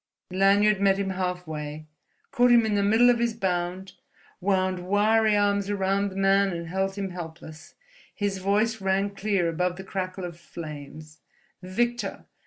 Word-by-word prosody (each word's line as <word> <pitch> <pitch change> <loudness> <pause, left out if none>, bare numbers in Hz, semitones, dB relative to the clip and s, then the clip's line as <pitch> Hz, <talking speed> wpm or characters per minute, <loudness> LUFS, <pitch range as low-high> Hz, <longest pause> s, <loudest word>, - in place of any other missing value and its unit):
Lanyard 200 +2 +3
met 195 -1 +4
him 195 -1 -2
halfway, 160 -5 -4 0.5
caught 245 0 +4
him 235 -2 +6
in 215 - 0
the 205 - +2
middle 225 +5 +5
of 240 - 0
his 235 -1 0
bound, 185 -2 -2 0.5
wound 185 -1 0
wiry 215 +2 +3
arms 200 0 +1
round 200 0 0
the 190 - -11
man 195 0 +3
and 170 0 -5
held 190 +2 -1
him 195 -2 -4
helpless. 160 -2 -9 0.4
His 200 -2 -2
voice 210 +3 +1
rang 195 +1 0
clear 195 -3 0
above 180 +2 -1
the 190 - -8
crackle 185 -1 -4
of 170 -1 -8
flames: 155 -2 -9 0.4
"Victor! 240 +6 -2
195 Hz, 155 wpm, -26 LUFS, 180-205 Hz, 0.5 s, him